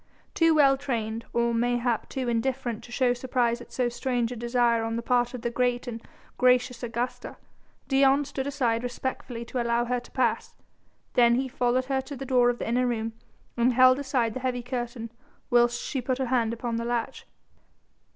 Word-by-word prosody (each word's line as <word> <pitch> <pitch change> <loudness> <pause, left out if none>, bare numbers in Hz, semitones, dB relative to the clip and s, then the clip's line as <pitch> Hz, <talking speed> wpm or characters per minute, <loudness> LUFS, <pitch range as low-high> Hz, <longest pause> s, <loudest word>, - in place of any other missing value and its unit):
Too 330 -1 +4
well 275 -3 +5
trained, 230 -4 -3
or 235 0 +1
mayhap 240 0 0
too 260 -2 -3
indifferent 240 -1 -1
to 240 - -14
show 250 -1 +2
surprise 245 -1 0
at - - -13
so 250 -1 0
strange 240 0 -1
a - - -4
desire 235 -1 +1
on 225 0 -2
the 235 - -3
part 245 +1 +1
of 245 - -8
the 235 - -1
great 245 0 0
and 230 -2 -6 0.4
gracious 250 -1 +3
Augusta, 245 +1 -4 0.5
Dion 275 +1 +4
stood 275 -1 -4
aside 245 -5 0
respectfully 245 -1 -5
to 245 +1 -3
allow 235 0 +1
her 250 +1 0
to 245 - -16
pass, 245 -4 -1 0.6
then 235 -1 +5
he 265 +2 0
followed 250 0 0
her 265 0 0
to 275 +2 -8
the 270 +1 -6
door 250 -2 +4
of 240 - -1
the - - -4
inner 250 +2 +1
room 225 -2 -2 0.4
and 245 +1 +2
held 255 +2 +6
aside 255 -5 0
the 260 - -4
heavy 250 -1 -2
curtain, 240 -2 -5 0.4
whilst 240 0 +4
she 270 - -3
put 255 +1 -1
her 265 - -1
hand 235 -3 +1
upon 235 0 -3
the 230 - -3
latch. 235 -1 -3
245 Hz, 190 wpm, -27 LUFS, 235-255 Hz, 0.6 s, held